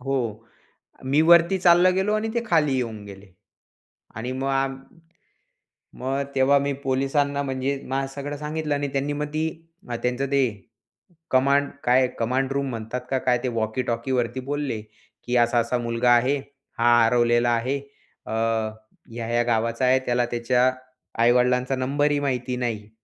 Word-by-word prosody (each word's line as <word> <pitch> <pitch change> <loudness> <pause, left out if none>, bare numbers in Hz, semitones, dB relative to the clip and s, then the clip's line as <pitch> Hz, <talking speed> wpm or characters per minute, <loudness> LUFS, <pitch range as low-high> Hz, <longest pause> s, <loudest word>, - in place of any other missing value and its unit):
हो, 135 +2 -2 1.0
मी 150 - +4
वरती 170 +2 +6
चाललो 175 +1 +5
गेलो 195 +3 +1
आणि 215 +1 -1
ते 235 0 -1
खाली 155 -9 +2
येऊन 115 -5 -3
गेले. 100 0 -12 0.9
आणि 115 +3 -4
मग 135 - -1
आम 135 0 0 1.2
मग 135 +2 -1
तेव्हा 135 +1 +4
मी 140 0 -1
पोलिसांना 140 +2 0
म्हणजे 135 0 -2
माझं 135 +1 -1
सगळं 145 +1 -5
सांगितलं 150 0 -3
आणि 145 0 -2
त्यांनी 140 +1 -1
मग 150 +1 -2
ती 155 +1 0 0.6
त्यांचं 125 +2 0
ते 140 0 +3 0.9
कमांड 140 +2 +3
काय 125 +1 +4
कमांड 130 +3 0
रूम 140 0 -1
म्हणतात 115 +1 -5
का 135 - +2
काय 125 -1 +2
ते - - 0
वॉकीटॉकीवरती 120 +2 -1
बोलले, 145 -7 -2 0.4
की 125 - -1
असा 120 0 +3
असा 120 +2 0
मुलगा 120 +1 +1
आहे. 130 +4 +3 0.4
हा 120 0 +5
हरवलेला 120 0 +3
आहे. 125 +4 0 0.5
अ, - - -5 0.8
ह्या-ह्या 120 +1 -1
गावाचा 115 +1 0
आहे. 130 +1 +4
त्याला 120 0 +1
त्याच्या 125 +2 +2 0.5
आई-वडिलांचा 125 +2 +3
नंबर 140 +3 0
ही 145 - +1
माहिती 125 -3 -2
नाही. 110 -4 -3
130 Hz, 145 wpm, -24 LUFS, 120-140 Hz, 1.2 s, वरती